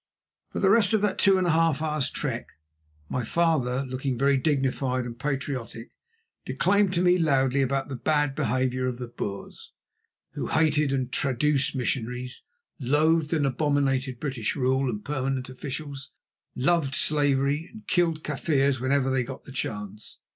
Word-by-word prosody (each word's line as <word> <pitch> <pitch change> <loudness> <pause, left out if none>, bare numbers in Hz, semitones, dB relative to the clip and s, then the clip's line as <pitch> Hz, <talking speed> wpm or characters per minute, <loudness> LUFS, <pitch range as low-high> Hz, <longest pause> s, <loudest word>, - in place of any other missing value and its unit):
For - - -3
the 195 -1 +4
rest 205 -2 +4
of 215 - +3
that 205 -2 0
two 195 -1 +5
and 185 - +1
a 175 - +3
half 165 -2 +2
hours' 155 -3 -1
trek - - -3 0.6
my 125 - -2
father, 135 -3 +1
looking 130 0 -3
very 140 +2 +3
dignified 130 -2 0
and 120 0 -8
patriotic, 135 -5 -4 0.5
declaimed 200 0 +2
to 175 - +2
me 180 0 +4
loudly 135 -4 +2
about 135 0 0
the 140 - -5
bad 145 +2 +1
behaviour 130 -1 0
of 125 -1 -3
the 125 - -5
Boers, 100 -4 -7 0.6
who - - -4
hated 150 -2 +2
and 130 -2 -1
traduced 140 +2 +1
missionaries, 125 0 -3 0.4
loathed 150 +4 +2
and 155 -4 +1
abominated 135 -2 0
British 130 -7 -2
rule 130 0 +1
and 105 -3 -5
permanent 135 -3 -2
officials, 135 +1 -6 0.5
loved 145 0 +1
slavery 145 +1 +1
and 220 -1 -13
killed 165 -3 +1
Kaffirs 140 -3 0
whenever 135 0 +1
they 130 -1 +1
got 130 +1 -8
the - - -11
chance. 105 -4 -5
135 Hz, 155 wpm, -26 LUFS, 130-155 Hz, 0.6 s, two